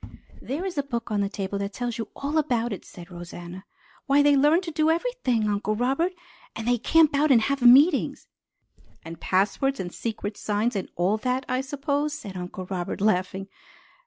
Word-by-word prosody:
"There 295 Hz, +9 st, -4 dB
is 360 Hz, -6 st, -3 dB
a -, -, +4 dB
book 235 Hz, -5 st, -5 dB
on 205 Hz, -1 st, +1 dB
that 200 Hz, +1 st, -2 dB
table 200 Hz, 0 st, -3 dB
that 200 Hz, 0 st, -4 dB
tells 240 Hz, 0 st, -4 dB
you 225 Hz, -, -3 dB
all 290 Hz, +3 st, -1 dB
about 240 Hz, -6 st, 0 dB
it," 195 Hz, -, -7 dB
said 175 Hz, 0 st, -13 dB
Rosanna. 175 Hz, +2 st, -9 dB, 0.4 s
"Why, 285 Hz, +1 st, +5 dB
they 290 Hz, 0 st, +5 dB
learn 295 Hz, +5 st, +4 dB
to 350 Hz, -3 st, -6 dB
do 310 Hz, 0 st, +1 dB
_every_thing, 325 Hz, -, 0 dB
Uncle 210 Hz, +1 st, 0 dB
Robert! 270 Hz, -, 0 dB, 0.4 s
And 225 Hz, 0 st, -5 dB
they 245 Hz, -1 st, +2 dB
camp 315 Hz, +5 st, +4 dB
out, 300 Hz, +2 st, +3 dB
and 255 Hz, -4 st, +6 dB
have 280 Hz, +1 st, -1 dB
meetings!" 275 Hz, +6 st, +5 dB, 0.8 s
"And 165 Hz, 0 st, -8 dB
passwords 235 Hz, +8 st, +1 dB
and 175 Hz, -2 st, -5 dB
secret 210 Hz, -2 st, -4 dB
signs 215 Hz, +3 st, -1 dB
and 195 Hz, -, -3 dB
all 185 Hz, +5 st, +1 dB
that, 255 Hz, +3 st, -1 dB
I 255 Hz, +1 st, 0 dB
suppose," 285 Hz, +2 st, -2 dB
said 200 Hz, -10 st, -8 dB
Uncle 180 Hz, +1 st, -6 dB
Robert, 180 Hz, -2 st, -4 dB
laughing. 190 Hz, -1 st, 0 dB
240 Hz, 190 wpm, -25 LUFS, 200-285 Hz, 0.8 s, and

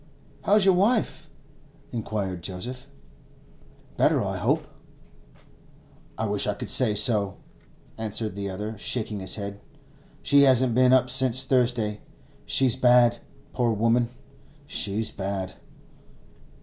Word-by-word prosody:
'How's 205 Hz, -1 st, +4 dB
your 190 Hz, -, +5 dB
wife?' 210 Hz, +6 st, 0 dB, 0.6 s
inquired 100 Hz, -6 st, -4 dB
Joseph. 110 Hz, +9 st, -7 dB, 1.1 s
'Better, -, -, +2 dB
I -, -, -3 dB
hope?' -, -, 0 dB, 1.5 s
'I 110 Hz, -, -2 dB
wish 105 Hz, -1 st, -1 dB
I 105 Hz, -, -1 dB
could -, -, -4 dB
say 115 Hz, -5 st, +4 dB
so,' 105 Hz, -3 st, +2 dB, 0.6 s
answered 110 Hz, -1 st, -3 dB
the 100 Hz, 0 st, -5 dB
other, 105 Hz, +4 st, -5 dB
shaking 110 Hz, -2 st, -4 dB
his 95 Hz, -1 st, -3 dB
head. 100 Hz, -1 st, -6 dB, 0.6 s
'She 140 Hz, 0 st, +4 dB
hasn't 130 Hz, -3 st, +4 dB
been 125 Hz, +1 st, +4 dB
up 130 Hz, -1 st, +4 dB
since 130 Hz, -1 st, +4 dB
Thursday. 120 Hz, -5 st, 0 dB, 0.5 s
She's 130 Hz, -3 st, +2 dB
bad, 125 Hz, -2 st, +4 dB, 0.3 s
poor 120 Hz, -2 st, +1 dB
woman! 115 Hz, +2 st, +1 dB, 0.6 s
she's 110 Hz, -5 st, -2 dB
bad. 95 Hz, -1 st, -4 dB
115 Hz, 115 wpm, -25 LUFS, 100-130 Hz, 1.5 s, your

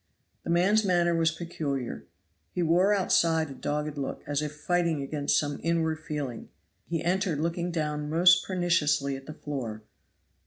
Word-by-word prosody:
The -, -, -6 dB
man's 190 Hz, +6 st, +3 dB
manner 175 Hz, -3 st, +2 dB
was 165 Hz, -1 st, +3 dB
peculiar. 155 Hz, -6 st, -4 dB, 0.4 s
He 180 Hz, -, -2 dB
wore 175 Hz, +5 st, +4 dB
outside 165 Hz, -6 st, +2 dB
a -, -, -6 dB
dogged 150 Hz, +1 st, -3 dB
look, 135 Hz, -, -4 dB
as 145 Hz, 0 st, -1 dB
if 150 Hz, 0 st, -4 dB
fighting 170 Hz, 0 st, 0 dB
against 145 Hz, +1 st, 0 dB
some 145 Hz, -1 st, -1 dB
inward 160 Hz, -1 st, 0 dB
feeling; 145 Hz, -6 st, -5 dB, 0.4 s
he 165 Hz, -2 st, -2 dB
entered 180 Hz, -3 st, 0 dB
looking 170 Hz, +2 st, -1 dB
down 150 Hz, -3 st, -2 dB
most 175 Hz, +2 st, +5 dB
perniciously 150 Hz, -7 st, +1 dB
at 135 Hz, 0 st, -10 dB
the 155 Hz, -, -7 dB
floor. 120 Hz, -9 st, -5 dB
160 Hz, 155 wpm, -28 LUFS, 145-175 Hz, 0.4 s, most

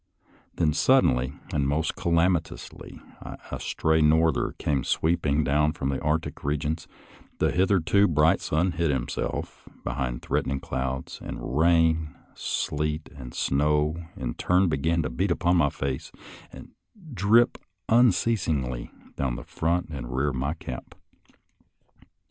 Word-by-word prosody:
Then 80 Hz, -3 st, +2 dB
suddenly 70 Hz, -, +3 dB, 0.2 s
and 70 Hz, -2 st, +1 dB
most 75 Hz, +3 st, 0 dB
calamitously 85 Hz, 0 st, -1 dB, 0.5 s
a -, -, -4 dB
stray 80 Hz, 0 st, +1 dB
norther 80 Hz, 0 st, +3 dB
came 70 Hz, -4 st, 0 dB
sweeping 80 Hz, -2 st, +1 dB
down 75 Hz, +2 st, +2 dB
from 65 Hz, -, -3 dB
the 70 Hz, -, -2 dB
Arctic 75 Hz, +2 st, -2 dB
regions, 75 Hz, +3 st, -2 dB, 0.5 s
the -, -, +2 dB
hitherto 95 Hz, +1 st, +3 dB
bright 75 Hz, 0 st, +3 dB
sun 85 Hz, +4 st, +1 dB
hid 85 Hz, -1 st, 0 dB
himself 65 Hz, -4 st, -3 dB
behind 60 Hz, -3 st, -3 dB
threat -, -, 0 dB
ening 70 Hz, +1 st, -2 dB
clouds, 65 Hz, 0 st, -4 dB
and 65 Hz, -, -6 dB
rain, 80 Hz, -2 st, +3 dB, 0.2 s
sleet, 75 Hz, +1 st, -2 dB
and 60 Hz, -4 st, -9 dB
snow, 75 Hz, +2 st, +1 dB, 0.2 s
in -, -, -3 dB
turn, 90 Hz, +1 st, +2 dB
began 80 Hz, +2 st, +1 dB
to 65 Hz, -, -2 dB
beat 95 Hz, +11 st, -1 dB
upon 90 Hz, 0 st, +2 dB
my 75 Hz, -4 st, +4 dB
face 65 Hz, -1 st, -4 dB, 0.4 s
and -, -, -11 dB, 0.4 s
drip 110 Hz, +4 st, +3 dB, 0.3 s
unceasingly 90 Hz, -, +2 dB, 0.3 s
down 65 Hz, -3 st, -1 dB
the -, -, -7 dB
front 85 Hz, +1 st, -1 dB
and 65 Hz, -6 st, -6 dB
rear 70 Hz, +3 st, +1 dB
of 65 Hz, -, -4 dB
my 70 Hz, +5 st, -1 dB
cap. 65 Hz, -6 st, -8 dB
75 Hz, 130 wpm, -26 LUFS, 70-85 Hz, 0.5 s, my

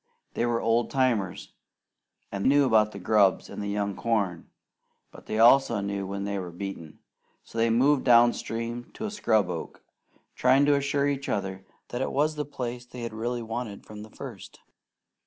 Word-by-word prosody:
They 120 Hz, -, 0 dB
were 120 Hz, -1 st, +1 dB
old 115 Hz, +1 st, +1 dB
timers, 120 Hz, -9 st, 0 dB, 0.8 s
and 100 Hz, 0 st, -1 dB
knew 140 Hz, +1 st, +5 dB
about 110 Hz, -3 st, +3 dB
the 100 Hz, -, -9 dB
grubs 100 Hz, 0 st, +2 dB
and -, -, -6 dB
the 100 Hz, -, -3 dB
young 100 Hz, -1 st, -2 dB
corn; 100 Hz, -7 st, -1 dB, 0.6 s
but -, -, -15 dB
they 110 Hz, -, -2 dB
also 115 Hz, 0 st, +5 dB
knew 100 Hz, -1 st, -3 dB
when 100 Hz, 0 st, -4 dB
they 100 Hz, 0 st, -2 dB
were 90 Hz, -2 st, -5 dB
beaten, 85 Hz, -3 st, -7 dB, 0.5 s
so 115 Hz, -, -7 dB
they 115 Hz, 0 st, +3 dB
moved 130 Hz, +5 st, +3 dB
down 120 Hz, -1 st, +6 dB
stream 115 Hz, +1 st, -5 dB
to 220 Hz, -, -5 dB
a 215 Hz, -, -3 dB
scrub 110 Hz, -, +2 dB
oak, 85 Hz, -2 st, -6 dB, 0.5 s
trying 130 Hz, +3 st, +4 dB
to 145 Hz, -, +4 dB
assure 140 Hz, 0 st, +1 dB
each 140 Hz, -1 st, -2 dB
other 95 Hz, -1 st, -3 dB, 0.2 s
that 120 Hz, -, -4 dB
it -, -, -1 dB
was 150 Hz, +3 st, +1 dB
the 150 Hz, -1 st, -3 dB
place 125 Hz, -3 st, -5 dB
they 125 Hz, -1 st, -7 dB
really 120 Hz, +2 st, -3 dB
had 115 Hz, -, -9 dB
wanted 110 Hz, -3 st, -5 dB
from 105 Hz, -1 st, -10 dB
the 110 Hz, -, -10 dB
first. -, -, -10 dB
115 Hz, 185 wpm, -27 LUFS, 100-125 Hz, 0.8 s, down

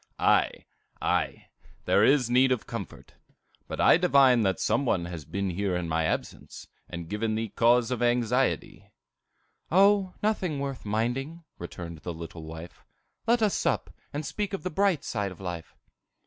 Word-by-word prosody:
"Ave, -, -, +2 dB, 0.3 s
aye, -, -, -1 dB, 0.4 s
there -, -, +4 dB
is 135 Hz, -3 st, +4 dB
need 130 Hz, +2 st, +4 dB
of 125 Hz, -4 st, 0 dB
comfort. -, -, -8 dB, 0.5 s
But -, -, -6 dB
I -, -, +6 dB
divine 140 Hz, -8 st, +5 dB
that 95 Hz, -4 st, +1 dB
some 115 Hz, +5 st, +1 dB
one 95 Hz, -9 st, 0 dB
has 85 Hz, -4 st, -7 dB
been 100 Hz, +4 st, -2 dB
here 95 Hz, +1 st, -1 dB
in 90 Hz, -1 st, -2 dB
my 80 Hz, 0 st, 0 dB
absence, -, -, -4 dB, 0.2 s
and 85 Hz, -1 st, -6 dB
given 110 Hz, +3 st, -1 dB
thee 110 Hz, 0 st, -2 dB
cause 120 Hz, +2 st, +3 dB
of 125 Hz, -, -2 dB
anxiety." 120 Hz, +1 st, 0 dB, 0.8 s
"O, 195 Hz, +1 st, +4 dB
nothing 185 Hz, -8 st, 0 dB
worth 135 Hz, -4 st, -4 dB
minding," 125 Hz, +10 st, -2 dB, 0.2 s
returned 85 Hz, -1 st, -7 dB
the 85 Hz, +2 st, -6 dB
little 80 Hz, 0 st, -8 dB
wife. 80 Hz, +2 st, -10 dB, 0.4 s
"Let 235 Hz, 0 st, +3 dB
us 210 Hz, -, +3 dB
sup, -, -, -1 dB, 0.2 s
and 145 Hz, +1 st, -4 dB
speak 205 Hz, +6 st, -3 dB
of 195 Hz, -, -4 dB
the 185 Hz, -, -3 dB
bright 190 Hz, -3 st, +1 dB
side 100 Hz, -3 st, -2 dB
of 90 Hz, -, -12 dB
life." 90 Hz, -3 st, -6 dB
120 Hz, 160 wpm, -27 LUFS, 90-145 Hz, 0.8 s, I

